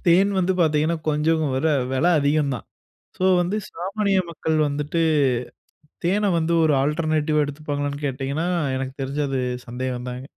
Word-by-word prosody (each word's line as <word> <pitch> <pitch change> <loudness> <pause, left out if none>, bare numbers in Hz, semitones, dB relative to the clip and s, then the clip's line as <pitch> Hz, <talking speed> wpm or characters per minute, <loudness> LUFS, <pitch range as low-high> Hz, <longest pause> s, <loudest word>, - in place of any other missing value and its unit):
தேன் 190 +4 +5
வந்து 185 0 +2
பாத்தீங்ன்னா, 155 +1 +2
கொஞ்சம் 155 +2 +2
வெல 150 +5 +1 0.2
வெல 135 +6 +1
அதிகந்தான். 145 -3 0 0.5
ஸோ 185 - -3 0.2
வந்து 185 +4 -1
சாமானிய 195 +3 0
மக்கள் 160 -1 -1
வந்துட்டு 150 +3 -1 1.0
தேன 200 +2 +2
வந்து 165 +1 0
ஒரு 155 -2 +3
ஆல்ட்ர்னேட்டிவா 155 0 +1
எடுத்துப்பாங்களான்னு 145 0 -4
கேட்டீங்கன்னா? 140 +5 -2 0.3
எனக்கு 130 0 -4
தெரிஞ்சு 140 +2 -2
அது 135 - -1 0.3
சந்தேகந்தாங்க. 125 0 -4
150 Hz, 125 wpm, -23 LUFS, 140-170 Hz, 1.0 s, தேன்